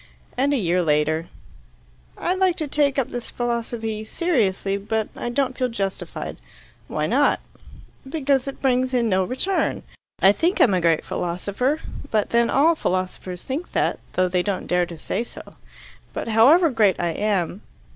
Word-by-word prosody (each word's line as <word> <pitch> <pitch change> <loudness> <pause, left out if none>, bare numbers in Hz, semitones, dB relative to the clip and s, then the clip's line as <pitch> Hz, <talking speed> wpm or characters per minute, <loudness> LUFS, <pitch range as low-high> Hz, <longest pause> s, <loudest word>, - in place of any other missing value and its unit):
And 275 +3 +2
a 285 - +2
year 180 -4 +1
later: 155 +1 +1 0.9
"I'd 365 +2 -1
like 370 -2 +3
to 310 - +1
take 285 -1 +1
up 270 - 0
this 245 -1 -5
philosophy 230 -2 -3
seriously, 215 - 0
but 210 +2 -2
I - - -4
don't 260 +1 0
feel 255 0 0
justified." 195 -4 -4 0.5
"Why - - -1
not?" - - +3 0.7
"Because 275 -3 +1
it 275 - -7
brings 255 0 +2
in 235 -2 +2
no 190 -1 +2
return. 260 - -1 0.4
I 195 - +7
think 335 - 0
I'm 210 - +5
a 180 - +2
great 165 -2 +2
philosopher, 200 - -1 0.3
but 215 -2 0
then 235 0 +3
all 310 +5 +4
philosophers 185 - -3
think 285 +7 -5
that, - - +1
though 185 0 +2
they 180 0 +1
don't 195 0 -2
dare 180 0 +1
to 170 -2 -9
say 220 - -2
so. - - -12 0.6
But, - - -4
however 285 +10 +6
great 215 -6 +3
I 175 - 0
am. 195 +1 -1
225 Hz, 165 wpm, -23 LUFS, 185-270 Hz, 0.9 s, I